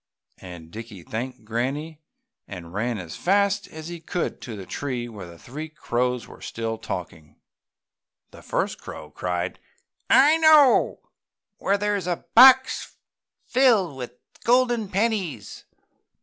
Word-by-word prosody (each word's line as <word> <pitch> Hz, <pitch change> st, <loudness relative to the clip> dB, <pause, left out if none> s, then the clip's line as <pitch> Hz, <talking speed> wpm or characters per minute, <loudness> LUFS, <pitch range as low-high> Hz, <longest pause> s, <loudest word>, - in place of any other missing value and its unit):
And 85 Hz, -3 st, -11 dB
Dickie 110 Hz, -5 st, -9 dB
thanked 120 Hz, +4 st, -6 dB
Granny 140 Hz, +8 st, -3 dB, 0.5 s
and 90 Hz, -3 st, -9 dB
ran 115 Hz, +3 st, -1 dB
as 85 Hz, -4 st, -7 dB
fast 200 Hz, +1 st, +1 dB
as 160 Hz, 0 st, -9 dB
he 175 Hz, -1 st, -7 dB
could 170 Hz, +2 st, -3 dB
to 115 Hz, -, -7 dB
the 95 Hz, -2 st, -8 dB
tree 125 Hz, -1 st, -4 dB
where 105 Hz, -6 st, -9 dB
the 85 Hz, -1 st, -13 dB
three 150 Hz, -, -8 dB
crows 125 Hz, -4 st, -2 dB
were -, -, -14 dB
still 115 Hz, -1 st, -4 dB
talking. 80 Hz, -4 st, -7 dB, 1.0 s
The -, -, -14 dB
first -, -, -2 dB
crow -, -, -9 dB
cried, 90 Hz, 0 st, -3 dB, 0.5 s
"I 285 Hz, +6 st, +6 dB
know 310 Hz, -4 st, +5 dB, 0.6 s
where 200 Hz, -, +1 dB
there 205 Hz, 0 st, 0 dB
is 190 Hz, -3 st, -4 dB
a 175 Hz, -1 st, -3 dB
box 260 Hz, +2 st, +6 dB, 0.5 s
filled 230 Hz, -, +3 dB
with 125 Hz, -2 st, -7 dB, 0.3 s
golden 240 Hz, -3 st, +2 dB
pennies!" 200 Hz, -5 st, -2 dB
145 Hz, 135 wpm, -24 LUFS, -, 1.0 s, I